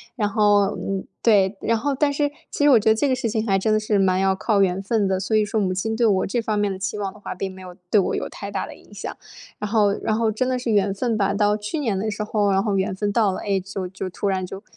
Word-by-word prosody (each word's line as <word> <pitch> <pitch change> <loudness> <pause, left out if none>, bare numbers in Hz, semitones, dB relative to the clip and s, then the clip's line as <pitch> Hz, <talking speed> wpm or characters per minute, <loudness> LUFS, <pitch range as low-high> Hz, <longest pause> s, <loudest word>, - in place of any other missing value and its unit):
然 215 -5 0
后， 205 -1 +3
嗯， 195 -1 -3 0.2
对 205 -3 +4
然 230 - +1
后 280 +6 -1
但 285 +1 +2
是 290 0 0 0.2
其 - - -1
实 290 - +6
我 250 -5 +7
觉 215 - +2
得 220 - +5
这 285 +6 +1
个 260 - +2
事 240 -3 -2
情 220 0 -1
还 195 -3 +2
真 215 +3 0
的 215 - +3
是 215 -1 0
蛮 185 -1 +2
要 190 0 +3
靠 200 +1 +1
缘 190 0 +1
分 205 0 0
的， 190 -1 0
所 190 +3 -1
以 215 - +4
说 215 +1 -1
母 190 -3 0
亲 220 +4 -2
对 235 +1 +2
我 190 -3 +2
这 240 +4 -1
方 215 -2 -1
面 205 -1 +1
的 190 - -5
期 195 +2 -3
望 200 -2 -3
的 - - -16
话， 205 - -6
并 190 +1 -4
没 190 - -12
有 180 -1 -10 0.2
对 210 - +6
我 190 - 0
有 - - -3
太 200 - -7
大 200 -2 -3
的 - - -10
影 - - -19
响。 205 - -6 0.4
然 210 - -3
后 210 -2 +3
然 215 - 0
后 225 -1 +1
真 240 +4 -1
的 255 0 0
是 245 -2 -2
缘 200 -2 +2
分 225 +2 -1
吧， 200 -1 +1
到 205 +1 +2
去 210 +9 -4
年 225 -9 -1
的 215 +3 -1
时 210 0 -3
候， 210 -1 +1
然 195 0 +2
后 205 -2 0
缘 190 0 -1
分 205 +1 -1
到 210 -1 +2
了。 - - -5
哎， 200 -2 0
就 190 0 -5
就 190 0 -5
突 195 - -3
然 190 -1 -1
就 195 +3 -9
205 Hz, 330 characters per minute, -23 LUFS, 195-220 Hz, 0.4 s, 我